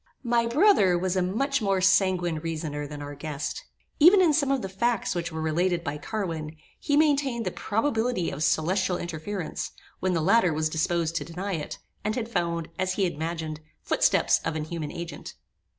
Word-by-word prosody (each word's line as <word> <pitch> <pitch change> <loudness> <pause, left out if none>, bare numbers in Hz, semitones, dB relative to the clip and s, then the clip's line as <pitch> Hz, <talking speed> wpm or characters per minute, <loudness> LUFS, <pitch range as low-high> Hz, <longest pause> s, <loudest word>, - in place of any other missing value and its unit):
My 235 -1 +2
brother 235 - +4
was 185 +1 -1
a 185 - +2
much 265 +9 0
more 195 -2 +1
sanguine 185 -3 +3
reasoner 155 -2 -4
than 145 0 -7
our 145 0 -6
guest. 145 0 -5 0.4
Even 355 +6 +8
in 345 -5 +5
some 285 -2 +2
of 275 -2 +1
the - - -2
facts 220 +3 0
which 170 -1 -3
were 160 0 -4
related 170 +2 +1
by 150 -2 -4
Carwin, 165 -6 -4 0.2
he 290 - +1
maintained 280 -6 +2
the 185 - -1
probability 225 -3 0
of 150 - -3
celestial 180 +4 +1
interference, 175 +2 -4 0.3
when 185 -1 0
the - - +2
latter 185 0 +4
was 155 +1 0
disposed 165 +1 0
to - - -2
deny 185 +4 -4
it, 155 -4 -4 0.3
and 215 +1 -1
had 230 -2 -3
found, 170 -6 -1
as 185 0 0
he 195 0 +1
imagined, 160 -1 -3 0.2
footsteps - - +3
of 160 - -2
an 155 - -2
human 155 -1 -5
agent. 170 0 -7
180 Hz, 180 wpm, -26 LUFS, 160-220 Hz, 0.4 s, Even